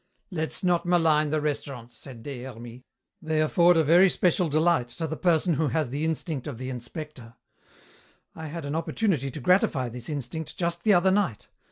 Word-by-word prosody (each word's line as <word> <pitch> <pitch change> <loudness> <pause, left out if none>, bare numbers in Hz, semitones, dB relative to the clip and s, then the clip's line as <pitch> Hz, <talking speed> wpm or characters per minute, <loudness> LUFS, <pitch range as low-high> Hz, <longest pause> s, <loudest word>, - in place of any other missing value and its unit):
"Let's 160 0 -2
not 175 -1 +1
malign 160 -4 +3
the 155 +1 0
restaurants," 140 -5 -4
said 120 -4 -11
Des 135 -2 -6
Hermies. 120 -1 -9 0.4
"They 160 -2 -1
afford 170 +3 +4
a 160 - +4
very 175 +5 +6
special 180 -1 +1
delight 155 -3 +2
to 120 +7 -5
the 160 0 -3
person 170 0 +2
who 155 +1 +1
has 150 -3 -1
the 145 +4 -2
instinct 160 -3 -3
of 140 -6 -5
the 130 +2 -5
inspector. 125 -1 -8 1.0
I 160 -1 -7
had 165 0 -6
an 145 - -3
opportunity 165 - -1
to 145 - -7
gratify 140 -5 +2
this 120 +3 -8
instinct 150 +2 -5
just 170 -1 -2
the 210 -2 +5
other 180 +2 +4
night. 185 - -1
155 Hz, 185 wpm, -26 LUFS, 130-170 Hz, 1.0 s, very